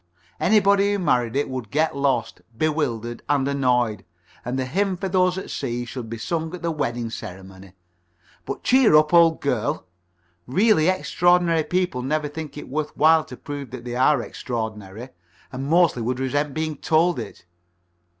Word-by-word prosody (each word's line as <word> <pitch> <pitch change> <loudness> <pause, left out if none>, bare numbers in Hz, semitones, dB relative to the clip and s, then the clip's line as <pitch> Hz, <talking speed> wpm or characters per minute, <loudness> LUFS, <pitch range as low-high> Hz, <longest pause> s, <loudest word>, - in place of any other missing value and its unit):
Anybody 200 0 +3
who - - 0
married 125 - +1
it 145 - +1
would 130 -5 -5
get 155 +3 0
lost, 135 -5 -1 0.2
bewildered, 120 -7 -1
and 140 -2 +2
annoyed, 125 -7 +1 0.4
and 125 +2 -3
the 130 - -1
hymn 190 +7 -1
for 190 - -3
those 185 -1 +2
at 190 - -6
sea 120 -2 -3
should 120 -2 -7
be 115 - -5
sung 160 +8 -3
at 180 - -11
the 170 - 0
wedding 120 -7 -3
ceremony. 95 -3 -9 0.7
But - - -5
cheer 255 -10 +5
up, 155 +1 +4
old 165 -1 +5
girl. 140 +2 -1 0.6
Really 185 - +3
extraordinary 175 -3 +2
people 180 -8 -1
never 150 +3 -1
think 150 0 -7
it - - -8
worth 150 +2 -4
while 160 +1 +5
to - - -10
prove 145 -3 -7
that 120 0 -9
they 120 0 -4
are 130 0 +3
extraordinary, 110 -1 -6 0.4
and 135 +1 -5
mostly 165 -5 +3
would 125 +2 -2
resent 140 +2 -1
being 155 -1 -2
told 165 +4 +2
it. - - -9
145 Hz, 165 wpm, -23 LUFS, 120-165 Hz, 0.7 s, cheer